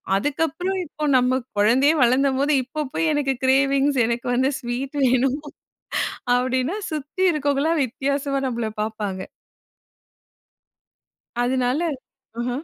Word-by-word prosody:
அதுக்கப்பறம் 325 Hz, -, -1 dB
இப்போ 305 Hz, 0 st, -8 dB
நம்ம 255 Hz, +1 st, +2 dB, 0.2 s
குழந்தையே 255 Hz, +9 st, +4 dB
வளந்தம்போது 270 Hz, +3 st, +2 dB
இப்போ 300 Hz, +5 st, -5 dB
போய் 325 Hz, -, +1 dB
எனக்கு 280 Hz, -2 st, +1 dB
கிரேவிங்ஸ் 275 Hz, +1 st, +3 dB
எனக்கு 235 Hz, +1 st, -2 dB
வந்து 260 Hz, +2 st, +2 dB
ஸ்வீட் 255 Hz, +3 st, -4 dB
வேணும் 255 Hz, +2 st, +2 dB, 1.0 s
அப்பிடின்னா 255 Hz, +6 st, 0 dB, 0.2 s
சுத்தி 305 Hz, +5 st, -3 dB
இருக்கவங்கள்லாம் 295 Hz, +1 st, +1 dB
வித்தியாசமா 275 Hz, +2 st, -2 dB
நம்மள 235 Hz, -3 st, -2 dB
பார்ப்பாங்க. 210 Hz, -3 st, -3 dB, 2.2 s
அதனால, 255 Hz, +4 st, +1 dB, 0.6 s
அஹ. 245 Hz, -, -2 dB
270 Hz, 100 wpm, -23 LUFS, 250-290 Hz, 2.2 s, குழந்தையே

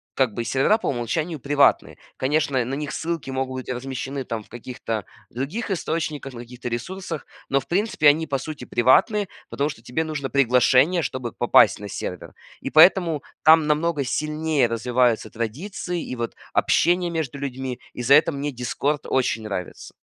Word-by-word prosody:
как 130 Hz, -5 st, +2 dB
бы 120 Hz, -, -3 dB
сервера 135 Hz, -, +2 dB
по -, -, -5 dB
умолчанию 150 Hz, +6 st, -2 dB
приватные. 140 Hz, +1 st, +2 dB, 0.2 s
Конечно, 135 Hz, -2 st, +1 dB
на 130 Hz, -, -4 dB
них 145 Hz, +1 st, -3 dB
ссылки 165 Hz, -4 st, -3 dB
могут 130 Hz, 0 st, -2 dB
быть -, -, -11 dB
размещены 135 Hz, +1 st, -5 dB
там 115 Hz, -2 st, -4 dB
в -, -, -25 dB
каких-то 115 Hz, -3 st, -5 dB, 0.2 s
других 150 Hz, -, -4 dB
источниках, 155 Hz, -6 st, -3 dB
на 120 Hz, -, -8 dB
каких-то 125 Hz, +1 st, -9 dB
ресурсах, 160 Hz, +7 st, -5 dB, 0.2 s
но, 135 Hz, -, +2 dB
в -, -, -17 dB
принципе, 185 Hz, -4 st, +2 dB
они, 160 Hz, +2 st, +2 dB
по 135 Hz, -, 0 dB
сути, 140 Hz, -1 st, -7 dB
приватные, 190 Hz, -, +3 dB, 0.2 s
потому 145 Hz, +2 st, -1 dB
что 115 Hz, -, -9 dB
тебе 125 Hz, +7 st, -2 dB
нужно 150 Hz, -4 st, -4 dB
приглашение, 135 Hz, +5 st, +4 dB
чтобы 125 Hz, -2 st, -4 dB
попасть 110 Hz, -4 st, +4 dB
на 105 Hz, -, -7 dB
сервер. 90 Hz, -2 st, -6 dB, 0.3 s
И -, -, -4 dB
поэтому 165 Hz, -2 st, +5 dB, 0.2 s
там 155 Hz, 0 st, +6 dB
намного 150 Hz, 0 st, +1 dB
сильнее 150 Hz, +1 st, 0 dB
развиваются 120 Hz, -1 st, +1 dB
традиции 165 Hz, -, -4 dB
и -, -, -5 dB
вот 115 Hz, 0 st, -4 dB, 0.2 s
общение 175 Hz, 0 st, +2 dB
между 155 Hz, -5 st, -3 dB
людьми, 130 Hz, -2 st, -4 dB
и 125 Hz, -, -5 dB
за 135 Hz, +4 st, +6 dB
это 155 Hz, +2 st, +4 dB
мне 140 Hz, +1 st, -3 dB
"Дискорд" 135 Hz, +4 st, -2 dB
очень 125 Hz, -4 st, 0 dB
нравится. 100 Hz, -4 st, -6 dB
135 Hz, 170 wpm, -23 LUFS, 125-160 Hz, 0.3 s, там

